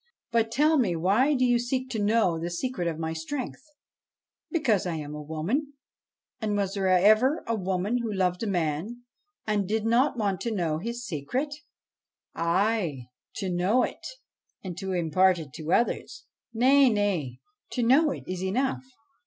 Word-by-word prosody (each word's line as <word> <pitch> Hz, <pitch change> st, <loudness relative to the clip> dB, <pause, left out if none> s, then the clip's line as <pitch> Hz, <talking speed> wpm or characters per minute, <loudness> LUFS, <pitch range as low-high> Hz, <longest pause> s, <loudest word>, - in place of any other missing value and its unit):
But, 225 Hz, -1 st, +1 dB
tell 300 Hz, +5 st, +3 dB
me, 190 Hz, -9 st, +1 dB
why 205 Hz, -, +3 dB
do 255 Hz, -1 st, +2 dB
you 245 Hz, -1 st, +3 dB
seek 255 Hz, +2 st, -2 dB
to 225 Hz, -, -2 dB
know 205 Hz, -6 st, +2 dB
the 170 Hz, +1 st, -3 dB
secret 175 Hz, 0 st, -3 dB
of 165 Hz, -2 st, -2 dB
my 160 Hz, 0 st, -3 dB
strength? 235 Hz, -, -5 dB, 0.4 s
' -, -, -67 dB
' -, -, -67 dB
Because 235 Hz, -, +1 dB
I 170 Hz, -, -2 dB
am 150 Hz, -1 st, -6 dB
a 150 Hz, -, -6 dB
woman; 180 Hz, -, -2 dB, 0.7 s
and 210 Hz, -3 st, -1 dB
was 195 Hz, -1 st, -1 dB
there 195 Hz, -2 st, -1 dB
ever 215 Hz, -, +4 dB
a 230 Hz, -, -1 dB
woman 195 Hz, +3 st, -1 dB
who 230 Hz, -2 st, -3 dB
loved 180 Hz, -2 st, 0 dB
a 225 Hz, -, -1 dB
man 180 Hz, +6 st, -2 dB, 0.4 s
and 210 Hz, -3 st, 0 dB
did 220 Hz, +2 st, -1 dB
not 245 Hz, +4 st, +2 dB
want 200 Hz, -4 st, -1 dB
to 235 Hz, -, -2 dB
know 160 Hz, -5 st, -1 dB
his 235 Hz, +5 st, -5 dB
secret?' 235 Hz, -, -3 dB, 0.4 s
' -, -, -51 dB
Ay 170 Hz, -, 0 dB, 0.3 s
to 190 Hz, -2 st, -3 dB
know 190 Hz, +8 st, +2 dB
it, -, -, -5 dB, 0.6 s
and 185 Hz, -3 st, -5 dB
to 190 Hz, 0 st, -4 dB
impart 180 Hz, +2 st, +3 dB
it 150 Hz, -5 st, -8 dB
to 160 Hz, 0 st, -4 dB
others.' 235 Hz, -, 0 dB, 0.3 s
1 225 Hz, -, -7 dB
Nay, 270 Hz, +1 st, +6 dB
nay; 195 Hz, -, -1 dB, 0.3 s
to 245 Hz, -, -1 dB
know 275 Hz, +7 st, +5 dB
it -, -, -5 dB
is 185 Hz, 0 st, -4 dB
enough. 255 Hz, +8 st, 0 dB
205 Hz, 180 wpm, -27 LUFS, 175-240 Hz, 0.7 s, Nay